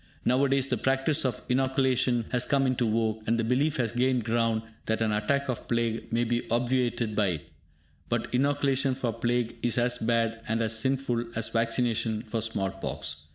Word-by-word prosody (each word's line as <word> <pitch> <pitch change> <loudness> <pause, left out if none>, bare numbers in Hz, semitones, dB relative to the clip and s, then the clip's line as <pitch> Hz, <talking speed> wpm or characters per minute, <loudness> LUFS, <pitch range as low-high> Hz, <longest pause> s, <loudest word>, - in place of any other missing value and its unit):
Now 130 +3 +3
a 140 - +3
days 135 -1 +3
the - - 0
practice 135 +3 +1
of 125 -4 -2
inoculation 130 -2 +2
has 125 -1 +2
come 140 0 +2
into 125 -3 +1
vogue, 110 0 0
and 115 +1 +2
the - - +1
belief 135 +6 +1
has 120 -4 0
gained 125 0 +1
ground 115 -1 +1 0.2
that 110 - +1
an 110 -1 +1
attack 125 +7 0
of 125 -3 -4
plague 115 -1 -1
may 115 +1 +2
be 120 0 -1
obviated 120 -2 0
by 105 -2 +2
it. 85 -5 -4 0.6
But - - -2
inoculation 135 0 +1
for 125 -3 -2
plague 120 0 -1
is 120 -1 0
as 125 0 +2
bad 115 0 0
and 110 +1 0
as 110 0 0
sinful 125 0 0
as 110 0 0
vaccination 115 -1 0
for 115 -1 -3
small 100 -4 -1
pox. 75 -6 -5
120 Hz, 190 wpm, -28 LUFS, 115-130 Hz, 0.6 s, Now